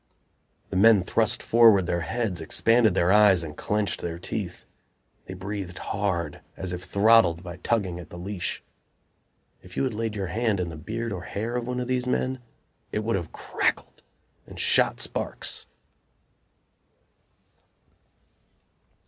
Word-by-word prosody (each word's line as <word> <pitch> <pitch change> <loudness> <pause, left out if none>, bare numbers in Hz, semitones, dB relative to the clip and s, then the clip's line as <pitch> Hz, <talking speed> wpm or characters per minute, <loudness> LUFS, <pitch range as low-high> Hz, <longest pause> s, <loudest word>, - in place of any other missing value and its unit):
The - - -3
men 105 0 +6
thrust 115 +5 +1
forward 110 -5 +6
their 85 0 -1
heads, 105 -3 -2
expanded 115 +5 +3
their 90 0 +3
eyes 100 -4 +6
and 75 -2 -7
clenched 105 +3 -1
their 85 -1 -4
teeth. 90 0 -5 0.6
They 95 - -7
breathed 95 -1 -6
hard, 95 -4 -2 0.2
as 95 -2 -3
if 90 - -5
throttled 100 -3 +4
by 90 -1 -8
tugging 95 -3 -1
at 85 - -10
the 85 - -10
leash. 90 0 -4 1.0
If 90 0 -14
you - - +1
had 130 -3 -1
laid 110 0 -3
your 100 -2 -2
hand 110 +1 0
in 90 -2 -2
the 80 - -7
beard 115 +9 -4
or 90 -3 -4
hair 110 +6 -4
of 120 -1 -2
one 125 0 -2
of 125 - -2
these 125 0 -1
men 130 +1 0 0.5
it 105 - -2
would 115 0 0
have 85 -4 -4
crackled - - -2 0.5
and - - -10
shot - - +3
sparks. - - -2
100 Hz, 150 wpm, -26 LUFS, 90-115 Hz, 1.0 s, men